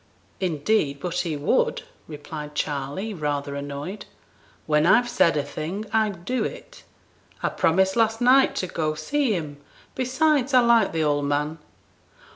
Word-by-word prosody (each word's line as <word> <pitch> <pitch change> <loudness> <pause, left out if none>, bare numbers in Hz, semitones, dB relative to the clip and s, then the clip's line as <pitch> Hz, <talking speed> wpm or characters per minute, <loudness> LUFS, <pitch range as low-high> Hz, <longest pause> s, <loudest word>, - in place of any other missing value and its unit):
'Indeed, 155 -4 0
but 175 +1 -4
he 165 -4 -2
would,' 145 - +1 0.2
replied 150 0 -8
Charley, 145 +10 -3
rather 145 -4 -3
annoyed; 145 +8 -6 0.6
'when 150 +1 +2
I've 240 +6 +5
said 240 -10 +2
a 145 - 0
thing, 180 +10 -5
I 220 -1 +3
do 200 +7 -3
it. - - -7 0.6
I - - +2
promised 190 +3 +2
last 225 -1 +2
night 260 +2 +4
to - - -1
go 155 -3 -2
see 280 - 0
him; 150 -5 -5 0.3
besides, 265 +1 +1
I 250 - +7
like 235 -1 +4
the 160 -1 0
old 145 -1 +1
man.' 150 +3 -1
170 Hz, 145 wpm, -24 LUFS, 150-225 Hz, 0.6 s, I